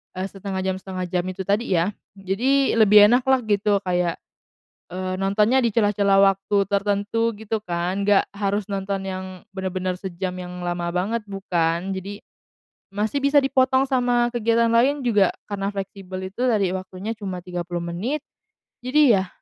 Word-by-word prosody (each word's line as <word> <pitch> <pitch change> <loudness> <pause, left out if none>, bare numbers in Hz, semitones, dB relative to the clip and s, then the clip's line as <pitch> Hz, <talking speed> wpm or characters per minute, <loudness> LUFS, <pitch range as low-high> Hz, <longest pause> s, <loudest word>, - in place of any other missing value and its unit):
eee, 185 +1 -3
1/2 195 -1 -5
jam 190 0 -1
1/2 185 -1 -5
jam 180 0 -1
itu 185 +1 -5
tadi 200 +1 0
ya, 170 +3 +2 0.3
jadi 235 +8 +1
lebih 210 -1 +7
enak 245 +1 +3
lah 265 -1 +3
gitu, 205 -1 +1
kayak, 180 -2 0 0.8
eee, 185 0 -3
nontonnya 210 +6 +2
di 225 - 0
celah-celah 205 -3 +3
waktu 195 +1 +2
tertentu 205 +3 0
gitu 220 +1 -3
kan, 180 +3 -2
nggak 205 -1 +3
harus 200 0 -1
nonton 195 0 -2
yang 190 -1 -5 0.2
bener-bener 185 -1 -3
sejam 185 0 -4
yang 180 0 -7
lama 175 -1 -3
banget, 210 +5 -1
bukan. 180 -3 -1
Jadi, 200 +2 -7 0.7
masih 215 +7 -1
bisa 280 +1 +4
dipotong 260 0 +3
sama 245 -2 +2
kegiatan 230 0 +2
lain 270 +5 +3
juga 205 -5 +4 0.2
karena 195 -1 -2
fleksibel 190 -1 -6
itu 220 +6 -6
tadi, 205 -7 +2
waktunya 190 +3 -6
cuma 190 -4 -5
30 175 -1 -4
menit. 215 - -3 0.6
Jadi 260 +1 +4
yah 190 -3 +1
195 Hz, 155 wpm, -23 LUFS, 185-225 Hz, 0.8 s, lebih